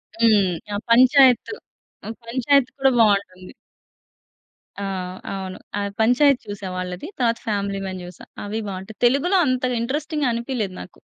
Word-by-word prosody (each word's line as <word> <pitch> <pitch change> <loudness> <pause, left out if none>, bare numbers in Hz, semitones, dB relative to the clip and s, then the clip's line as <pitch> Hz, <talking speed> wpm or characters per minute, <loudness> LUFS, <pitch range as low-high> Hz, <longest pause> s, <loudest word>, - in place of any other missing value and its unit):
హ్మ్. 215 -5 +3 0.2
ఆ! - - -1
'పంచాయత్ 255 - +5 0.7
పంచాయత్' 255 +3 +1
కూడా 270 -1 +3
బావుంటుంది. 200 -4 +1 1.3
ఆ! - - -2 0.5
అవును. 190 -1 -6 0.2
ఆ - - -1 0.2
'పంచాయత్' 250 +4 +3
చూసా 205 -1 -6
వాళ్ళది. 185 - -5
తరువాత 235 -2 +1
'ఫ్యామిలీ 200 -2 -2
మాన్' 185 -1 -5
చూసా. 180 -1 -12 0.2
అవి 210 +2 -4
బాగుంటాయి. 195 +2 -7
తెలుగులో 280 +10 +3
అంత 255 -1 0 0.2
ఇంట్రెస్టింగ్‌గా 290 +3 -1
అనిపియలేదు 235 -5 -3
నాకు. 90 - -13
230 Hz, 125 wpm, -22 LUFS, 195-260 Hz, 1.3 s, పంచాయత్